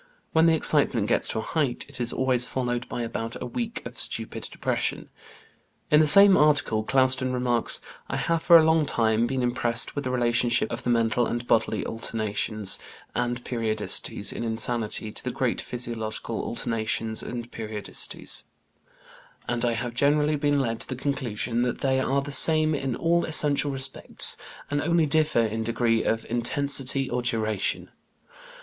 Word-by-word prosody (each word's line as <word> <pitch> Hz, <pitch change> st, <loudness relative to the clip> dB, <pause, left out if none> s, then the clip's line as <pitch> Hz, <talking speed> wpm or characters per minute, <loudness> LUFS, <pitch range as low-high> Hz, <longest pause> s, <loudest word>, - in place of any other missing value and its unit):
When 160 Hz, +1 st, +4 dB
the 165 Hz, -, +4 dB
excitement 140 Hz, -8 st, +2 dB
gets -, -, +3 dB
to -, -, -3 dB
a 110 Hz, -, -2 dB
height, 140 Hz, -4 st, -1 dB
it 140 Hz, -3 st, -8 dB
is 120 Hz, -, -1 dB
always 125 Hz, -2 st, +1 dB
followed 125 Hz, -1 st, -3 dB
by 120 Hz, -, -4 dB
about 115 Hz, 0 st, -5 dB
a -, -, -5 dB
week 235 Hz, -2 st, -5 dB
of -, -, -5 dB
stupid -, -, -1 dB
depression." -, -, -2 dB, 0.8 s
In 150 Hz, -, +6 dB
the 155 Hz, -, +4 dB
same 200 Hz, +3 st, +8 dB
article 145 Hz, -, +3 dB
Clouston 130 Hz, +1 st, +2 dB
remarks: 125 Hz, -2 st, 0 dB, 0.3 s
"I -, -, -2 dB
have 165 Hz, +5 st, -1 dB
for 170 Hz, 0 st, +7 dB
a 160 Hz, -, +5 dB
long 160 Hz, -1 st, +2 dB
time 115 Hz, -1 st, +1 dB
been 130 Hz, 0 st, -2 dB
impressed 120 Hz, 0 st, +1 dB
with 145 Hz, -, -3 dB
the 130 Hz, -, -3 dB
relationship 120 Hz, -1 st, +1 dB
of 120 Hz, +2 st, -4 dB
the 125 Hz, -, -3 dB
mental 115 Hz, 0 st, +1 dB
and 120 Hz, 0 st, -4 dB
bodily 110 Hz, -3 st, +1 dB
alternations 110 Hz, -2 st, -2 dB, 0.3 s
and 120 Hz, 0 st, -2 dB
periodicities 110 Hz, -3 st, -2 dB
in -, -, -5 dB
insanity 110 Hz, -1 st, -1 dB
to -, -, -4 dB
the -, -, -3 dB
great -, -, -1 dB
physiological 115 Hz, -2 st, -4 dB
alternations 110 Hz, -1 st, -1 dB
and 120 Hz, 0 st, -6 dB
periodicities, 105 Hz, -2 st, -4 dB, 1.0 s
and 120 Hz, -1 st, -1 dB
I 120 Hz, -1 st, +1 dB
have 115 Hz, +1 st, -4 dB
generally 150 Hz, +4 st, +2 dB
been 145 Hz, 0 st, +1 dB
led 115 Hz, -4 st, -2 dB
to -, -, -4 dB
the 130 Hz, -, -3 dB
conclusion 125 Hz, -4 st, -2 dB
that 125 Hz, 0 st, -2 dB
they 130 Hz, -1 st, +1 dB
are 135 Hz, +1 st, 0 dB
the 145 Hz, -, -7 dB
same 155 Hz, +2 st, +4 dB
in 135 Hz, -4 st, -2 dB
all 170 Hz, +4 st, +1 dB
essential 150 Hz, -2 st, +4 dB
respects, 135 Hz, 0 st, +1 dB, 0.4 s
and 145 Hz, 0 st, 0 dB
only 170 Hz, +1 st, +2 dB
differ 155 Hz, -4 st, +2 dB
in 110 Hz, +1 st, -3 dB
degree 115 Hz, 0 st, 0 dB
of 115 Hz, 0 st, -1 dB
intensity 135 Hz, +2 st, 0 dB
or 125 Hz, 0 st, -2 dB
duration. 110 Hz, -4 st, -2 dB
125 Hz, 165 wpm, -25 LUFS, 115-145 Hz, 1.0 s, same